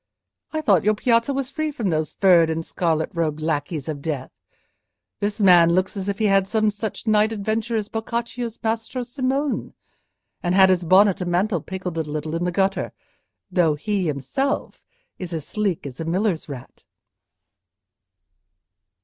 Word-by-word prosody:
I 315 - -2
thought 200 - +3
your 215 +2 +3
piazza 230 +4 +2
was 275 -2 -2
free 310 0 -2
from 230 -10 -2
those 155 -1 -1
furred 175 -4 +5
and 160 0 -2
scarlet 160 -3 -1
robed 160 -3 -1
lackeys 155 -1 -2
of 150 -3 -4
death. 140 -4 -4 0.9
This 205 +2 -2
man 175 -4 +6
looks 185 +3 0
as 195 0 -3
if 200 - -2
he 220 - 0
had 200 - +3
had 195 -1 +3
some 215 0 +2
such 210 +1 -5
night 215 0 +3
adventure 220 +2 -2
as 215 -2 -1
Boccaccio's 235 +1 -4
Maestro 225 +3 -2
Simone, 265 +3 -2 0.7
and 175 +1 0
had 190 -1 +7
his 180 -1 +1
bonnet 190 +3 +4
and 180 - -2
mantle 180 0 +1
pickled 185 -2 -5
a - - +2
little 155 0 -4
in 170 +1 -1
the 180 - 0
gutter; 195 +2 0 0.6
though 170 -5 +3
he 195 +3 -1
himself 155 - -2 0.4
is 180 -2 -6
as 160 -3 -4
sleek 205 -8 -1
as 130 -3 -8
a - - -2
miller's 180 -1 -1
rat." 130 -2 -10
190 Hz, 165 wpm, -23 LUFS, 165-220 Hz, 0.9 s, had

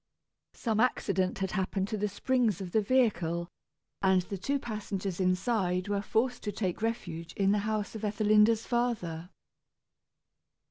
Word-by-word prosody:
Some 220 -3 -1
accident 195 -6 +1
had 190 -1 -2
happened 190 -1 -1
to 220 - -1
the 210 +1 0
springs 230 0 +1
of 185 -3 -6
the 220 - +3
vehicle, 180 -8 +1 0.5
and 190 -1 +4
the 195 +2 -5
two 280 +9 0
passengers 200 -6 -4
inside 185 0 +1
were 200 -1 0
forced 240 +5 0
to 205 - -3
take 190 -2 -2
refuge 170 -8 -3
in 195 -1 +2
the 210 - +3
house 215 -1 -2
of 220 - -6
Ethelinda's 215 +1 +3
father. 195 -9 -1
205 Hz, 145 wpm, -30 LUFS, 185-225 Hz, 0.5 s, and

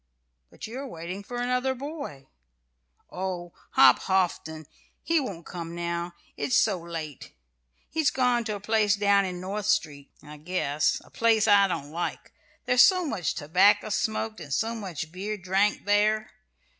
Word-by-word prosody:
"But - - -9
you 235 +4 -7
are 275 - -6
waiting 180 -2 -7
for 245 +4 -7
another 250 +2 0
boy." 280 - -7 0.9
"Oh, 180 -2 -4 0.2
Hop 130 -2 +7
Houghton! 170 -4 -1 0.4
He 330 -1 +2
won't 195 - -5
come 170 -1 -7
now, 170 0 -3 0.2
it's 140 -2 -1
so 200 -4 +3
late. 165 -4 -7 0.5
He's 315 -2 +1
gone 250 -2 +1
to 215 -2 -2
a - - -6
place 210 0 +2
down 200 -1 +3
in 180 -1 -5
North 195 +3 -4
Street, 155 -10 0
I 150 0 -11
guess 150 -2 -1
a - - -20
place 225 -2 +3
I 200 -1 +6
don't 145 -5 -4
like: 170 +2 -4 0.3
there's 250 0 +5
so 365 -2 +5
much 190 - -2
tobacco 190 +8 +3
smoked 220 +1 -2
and 150 -4 -9
so 225 +11 0
much 180 -8 -6
beer 200 +4 -4
drank 195 +2 0
there." 215 +1 +2
195 Hz, 155 wpm, -27 LUFS, 170-220 Hz, 0.9 s, Hop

